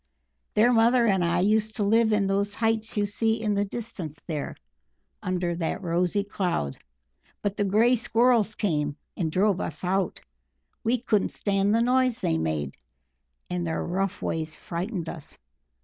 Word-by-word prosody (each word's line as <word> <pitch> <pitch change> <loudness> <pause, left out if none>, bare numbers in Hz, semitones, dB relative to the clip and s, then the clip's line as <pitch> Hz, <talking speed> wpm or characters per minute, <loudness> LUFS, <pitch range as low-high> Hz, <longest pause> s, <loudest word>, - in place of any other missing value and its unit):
"Their 235 +4 +5
mother 235 +1 +4
and 190 -5 +3
I 175 +1 +2
used 215 +2 +2
to 215 - 0
live 220 +2 +3
in 210 -2 +2
those 200 +1 0
heights 225 -1 0
you 205 - +2
see 220 +2 0
in 215 -2 0
the 200 0 +1
distance 195 -8 -6
there, 155 -4 -4 0.7
under 180 -1 -1
that 170 +3 -2
rosy 180 +3 +1
cloud. 180 - -2 0.7
But 205 -1 -1
the 205 - 0
Grey 220 +6 +4
Squirrels 230 -2 +3
came, 150 -7 -1 0.2
and 165 -4 -1
drove 195 +2 +2
us 155 +2 -4
out 190 +1 0 0.6
we 240 +2 +2
couldn't 215 -5 +1
stand 200 +1 +1
the 230 - +3
noise 255 -1 +2
they 80 - 0
made, 75 -3 -2 0.7
and 180 -1 -2
their 160 - -1
rough 190 +2 -2
ways 160 -1 -2
frightened 175 +1 -4
us. 160 -4 -8
200 Hz, 160 wpm, -26 LUFS, 175-220 Hz, 0.7 s, Their